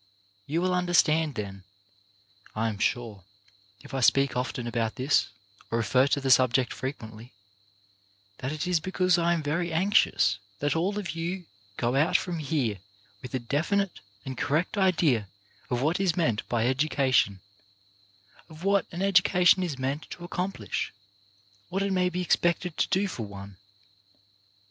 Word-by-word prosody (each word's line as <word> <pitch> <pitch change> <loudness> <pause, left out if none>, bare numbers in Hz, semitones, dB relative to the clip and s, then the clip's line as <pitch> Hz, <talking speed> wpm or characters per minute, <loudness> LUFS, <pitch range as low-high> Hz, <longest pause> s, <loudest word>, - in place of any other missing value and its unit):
You 165 +4 0
will 185 0 +1
understand, 165 -4 +2
then, 100 -3 -6 0.9
I 115 +1 0
am 105 -2 -6
sure, 110 -6 -1 0.6
if - - -13
I 135 - -1
speak 135 +2 +3
often 125 -1 -2
about 115 -2 -2
this, 135 +3 +2 0.4
or 115 - 0
refer 125 +4 +3
to 140 - +1
the 135 -1 0
subject 130 -1 +4
frequently, 115 -3 -7 1.1
that 130 - -3
it 155 -1 -3
is 180 -2 +2
because 185 +1 +1
I 170 0 +2
am 165 -2 -2
very 165 +4 -1
anxious 160 - +3 0.2
that 145 +6 0
all 190 +5 0
of 190 -6 -3
you 170 +2 -4 0.3
go 120 +2 0
out 155 +6 +4
from 175 -3 -4
here 140 -9 -1 0.4
with 125 0 -6
a - - 0
definite 170 - -1 0.3
and 130 - -5
correct 160 +7 0
idea 165 - +2 0.4
of 125 +1 -1
what 160 +5 +1
is 185 -4 +1
meant 120 -11 0
by 115 -1 +1
education, 130 -6 +2 1.1
of 160 +1 -12
what 200 0 +2
an 175 +3 -3
education 180 -1 +4
is 165 -7 -2
meant 135 +3 -3
to 175 - -9
accomplish, 180 - -3 0.8
what 195 +2 -1
it 200 -1 0
may 180 -1 +2
be 180 +1 -3
expected 175 -1 +1
to - - +2
do 195 +1 +1
for 115 - -5
one. 100 -1 -10
150 Hz, 155 wpm, -27 LUFS, 125-180 Hz, 1.1 s, subject